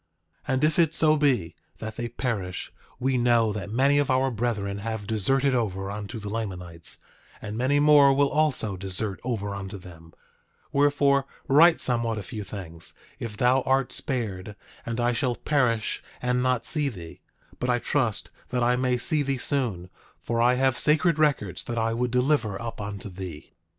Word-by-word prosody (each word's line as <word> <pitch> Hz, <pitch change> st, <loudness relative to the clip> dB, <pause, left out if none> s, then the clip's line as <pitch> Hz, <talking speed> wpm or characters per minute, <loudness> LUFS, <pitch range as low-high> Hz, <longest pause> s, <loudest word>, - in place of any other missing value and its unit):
9:24 -, -, +1 dB
And 130 Hz, +2 st, 0 dB
if 155 Hz, +1 st, +2 dB
it 165 Hz, -2 st, +3 dB
so 155 Hz, 0 st, +4 dB
be 130 Hz, -, +1 dB, 0.2 s
that 110 Hz, 0 st, -6 dB
they 120 Hz, 0 st, -4 dB
perish, 105 Hz, -7 st, -3 dB, 0.3 s
we 130 Hz, 0 st, +1 dB
know 120 Hz, -3 st, +3 dB
that 100 Hz, -1 st, -5 dB
many 135 Hz, +6 st, +3 dB
of 145 Hz, -1 st, 0 dB
our 130 Hz, 0 st, +2 dB
brethren 105 Hz, -4 st, -2 dB
have 110 Hz, 0 st, -4 dB
deserted 130 Hz, +6 st, +1 dB
over 100 Hz, -5 st, -1 dB
unto 105 Hz, +1 st, -6 dB
the 105 Hz, -2 st, -7 dB
Lamanites, 90 Hz, -6 st, -5 dB, 0.4 s
and 105 Hz, 0 st, -6 dB
many 130 Hz, +5 st, +2 dB
more 145 Hz, -2 st, +7 dB
will 140 Hz, +1 st, +2 dB
also 140 Hz, -10 st, +1 dB
desert 95 Hz, +2 st, -2 dB
over 105 Hz, -5 st, -2 dB
unto 100 Hz, 0 st, -6 dB
them; 85 Hz, -3 st, -13 dB, 0.6 s
wherefore, 140 Hz, -1 st, +3 dB, 0.2 s
write 160 Hz, +4 st, +6 dB
somewhat 115 Hz, -3 st, +1 dB
a 105 Hz, -, -4 dB
few 105 Hz, +3 st, -6 dB
things, 90 Hz, -4 st, -6 dB, 0.2 s
if 105 Hz, -3 st, -6 dB
thou 125 Hz, +3 st, +3 dB
art 135 Hz, 0 st, +1 dB
spared 105 Hz, -, -4 dB, 0.3 s
and 115 Hz, +1 st, -3 dB
I 120 Hz, +1 st, +2 dB
shall 120 Hz, +1 st, 0 dB
perish 120 Hz, -7 st, 0 dB, 0.2 s
and 125 Hz, 0 st, 0 dB
not 125 Hz, -2 st, +1 dB
see 150 Hz, -3 st, +1 dB
thee; 85 Hz, -9 st, -10 dB, 0.4 s
but 125 Hz, -, -1 dB
I 120 Hz, -, +3 dB
trust 120 Hz, -3 st, -1 dB, 0.2 s
that 125 Hz, -1 st, 0 dB
I 125 Hz, +1 st, +3 dB
may 125 Hz, 0 st, +1 dB
see 150 Hz, +5 st, 0 dB
thee 140 Hz, -1 st, -1 dB
soon; 115 Hz, -10 st, -1 dB, 0.3 s
for 115 Hz, 0 st, -1 dB
I 125 Hz, +1 st, +4 dB
have 130 Hz, -1 st, +1 dB
sacred 160 Hz, +1 st, +3 dB
records 125 Hz, -, +1 dB
that 120 Hz, -, -4 dB
I 115 Hz, 0 st, +1 dB
would 125 Hz, +2 st, 0 dB
deliver 125 Hz, -5 st, +1 dB
up 115 Hz, -2 st, -6 dB
unto 100 Hz, -1 st, -6 dB
thee. 90 Hz, -5 st, -8 dB
120 Hz, 175 wpm, -26 LUFS, 100-135 Hz, 0.6 s, more